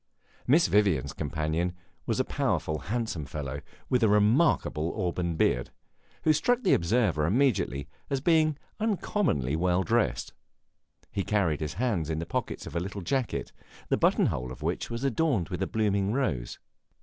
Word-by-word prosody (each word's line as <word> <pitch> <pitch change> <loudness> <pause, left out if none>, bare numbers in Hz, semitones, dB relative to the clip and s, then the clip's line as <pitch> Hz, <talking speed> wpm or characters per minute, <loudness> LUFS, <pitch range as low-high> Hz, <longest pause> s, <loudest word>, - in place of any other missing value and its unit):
Miss 155 +7 +5
Vivian's 85 -10 +2
companion 80 +4 -2 0.3
was - - 0
a - - +4
powerful, 75 0 -1
handsome 110 - -2
fellow, 70 0 -5 0.3
with 125 - +2
a 110 - +4
remarkable 105 - +3
auburn 85 -1 -1
beard, - - +1 0.5
who 155 - +5
struck 245 - +1
the 190 - +4
observer 85 -5 +2
immediately 95 - +1 0.2
as 140 -2 0
being 155 0 +3 0.2
uncommonly 195 - 0
well 90 +3 +2
dressed. 115 +2 0 0.8
He 100 - -1
carried 90 -9 +1
his 75 -2 -3
hands 100 -8 0
in 80 - -1
the 85 - -3
pockets - - -3
of - - -8
a - - +2
little 95 +3 -5
jacket, 125 +7 -2 0.4
the - - +3
button - - +3
hole 65 0 -2
of 65 - -9
which - - -2
was 115 +2 -4
adorned 135 - +1
with 90 -2 -4
a - - 0
blooming 100 -2 +1
rose. 85 - -1
95 Hz, 160 wpm, -28 LUFS, 80-125 Hz, 0.8 s, Miss